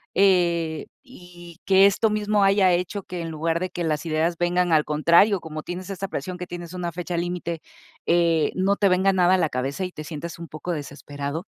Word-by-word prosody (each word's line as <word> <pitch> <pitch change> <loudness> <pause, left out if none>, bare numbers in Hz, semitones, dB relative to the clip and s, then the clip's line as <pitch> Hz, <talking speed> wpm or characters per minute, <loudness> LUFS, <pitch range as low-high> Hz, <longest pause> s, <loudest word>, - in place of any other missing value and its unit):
Eh, 170 -5 +2 0.2
y 175 - -14
que 195 0 +6
esto 205 +3 +3
mismo 210 -1 +1
haya 195 -2 +4
hecho 180 +3 -2
que 180 -2 -6
en 165 - -5
lugar 165 +1 -1
de 185 0 -3
que 175 - -4
las 155 0 -1
ideas 160 +2 0
vengan, 175 0 +1
al 150 -1 +4
contrario, 170 +7 +4
como 155 -1 -6
tienes 180 +2 -6
esa 195 0 -4
presión 185 -1 -5
que 180 - -6
tienes 175 0 -8
una 175 -1 -3
fecha 175 +1 -5
límite, 170 -1 -3 0.5
eh, 165 -3 +3
no 190 +2 +2
te 200 - +3
venga 190 +2 +3
nada 185 0 +4
a - - +2
la 160 -4 +1
cabeza 135 +8 -3
y 180 - -6
te 155 - -8
sientas 165 +2 -7
un 170 - -7
poco 155 +4 -6
desesperado 145 +1 -5
175 Hz, 205 wpm, -24 LUFS, 160-185 Hz, 0.5 s, que